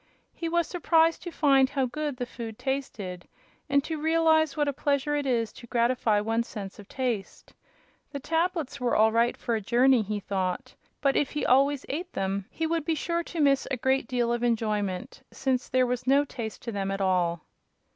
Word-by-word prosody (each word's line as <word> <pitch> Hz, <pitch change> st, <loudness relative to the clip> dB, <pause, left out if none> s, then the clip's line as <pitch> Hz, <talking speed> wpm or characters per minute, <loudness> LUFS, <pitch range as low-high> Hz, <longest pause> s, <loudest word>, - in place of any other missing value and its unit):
He 335 Hz, -, -4 dB
was 340 Hz, 0 st, +2 dB
surprised 330 Hz, -1 st, +2 dB
to 350 Hz, -, -6 dB
find 275 Hz, -4 st, +4 dB
how 270 Hz, -2 st, 0 dB
good 295 Hz, +1 st, -3 dB
the 245 Hz, -, -2 dB
food 230 Hz, -2 st, -8 dB
tasted, 210 Hz, -10 st, -4 dB, 0.4 s
and 280 Hz, 0 st, +3 dB
to 315 Hz, -1 st, -4 dB
realize 320 Hz, -1 st, +3 dB
what 295 Hz, -1 st, +1 dB
a 285 Hz, -, 0 dB
pleasure 285 Hz, +1 st, 0 dB
it 290 Hz, -1 st, -1 dB
is 230 Hz, -3 st, 0 dB
to 240 Hz, -, -12 dB
gratify 235 Hz, -3 st, +2 dB
one's 225 Hz, +2 st, -1 dB
sense 200 Hz, -3 st, -7 dB
of 205 Hz, -, -12 dB
taste. 245 Hz, -7 st, -4 dB, 0.6 s
The 280 Hz, -, -4 dB
tablets 325 Hz, -1 st, -1 dB
were 245 Hz, -1 st, +1 dB
all 220 Hz, +1 st, +5 dB
right 235 Hz, +1 st, +2 dB
for 235 Hz, -, -2 dB
a 220 Hz, -, 0 dB
journey, 245 Hz, +4 st, +4 dB
he 210 Hz, 0 st, -3 dB
thought, 185 Hz, -2 st, -3 dB, 0.3 s
but 275 Hz, -2 st, +2 dB
if 285 Hz, -, +2 dB
he 300 Hz, -, -1 dB
always 275 Hz, +2 st, +3 dB
ate 345 Hz, +6 st, -4 dB
them 195 Hz, 0 st, -2 dB
he 325 Hz, -, -3 dB
would 330 Hz, -1 st, 0 dB
be 320 Hz, +1 st, 0 dB
sure 340 Hz, +3 st, -1 dB
to 340 Hz, -, -6 dB
miss 275 Hz, -2 st, +3 dB
a 265 Hz, -, -1 dB
great 265 Hz, +1 st, +1 dB
deal 240 Hz, -1 st, 0 dB
of 240 Hz, -, -2 dB
enjoyment, 210 Hz, -6 st, -1 dB
since 260 Hz, -2 st, -1 dB
there 255 Hz, -1 st, +3 dB
was 250 Hz, 0 st, -3 dB
no 280 Hz, +2 st, +4 dB
taste 225 Hz, -5 st, -7 dB
to 235 Hz, -, -4 dB
them 195 Hz, -2 st, -2 dB
at 195 Hz, 0 st, -2 dB
all. 180 Hz, -3 st, +1 dB
255 Hz, 200 wpm, -27 LUFS, 220-295 Hz, 0.6 s, all